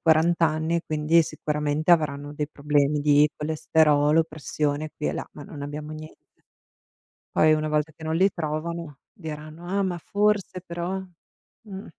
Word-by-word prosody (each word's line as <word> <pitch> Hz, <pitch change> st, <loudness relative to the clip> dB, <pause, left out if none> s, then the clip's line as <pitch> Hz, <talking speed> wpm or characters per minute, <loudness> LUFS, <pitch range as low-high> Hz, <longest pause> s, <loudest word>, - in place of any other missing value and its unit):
40 165 Hz, +1 st, +4 dB
anni, 160 Hz, +2 st, -1 dB
quindi 155 Hz, +2 st, +3 dB
sicuramente 150 Hz, 0 st, -1 dB
avranno 145 Hz, -3 st, +2 dB
dei 150 Hz, 0 st, -2 dB
problemi 145 Hz, 0 st, +1 dB
di 145 Hz, 0 st, +5 dB
colesterolo, 150 Hz, 0 st, +3 dB
pressione 155 Hz, -1 st, -3 dB
qui 150 Hz, -, -4 dB
e -, -, -1 dB
là," -, -, -4 dB
ma 145 Hz, -, -10 dB
non 145 Hz, -1 st, -9 dB
abbiamo 150 Hz, +1 st, -6 dB
niente. 155 Hz, 0 st, -10 dB, 1.1 s
Poi 155 Hz, 0 st, +5 dB
una 155 Hz, 0 st, -1 dB
volta 150 Hz, +1 st, 0 dB
che 160 Hz, -, -10 dB
non 160 Hz, 0 st, -1 dB
li 190 Hz, +4 st, +4 dB
trovano 160 Hz, -2 st, -4 dB
diranno: 160 Hz, -3 st, -8 dB
"Ah, 200 Hz, +2 st, 0 dB
ma 185 Hz, -2 st, -1 dB
forse, 200 Hz, +1 st, 0 dB
però" 175 Hz, +2 st, -4 dB, 0.6 s
mh. 200 Hz, -2 st, -9 dB
155 Hz, 150 wpm, -25 LUFS, 150-170 Hz, 1.1 s, di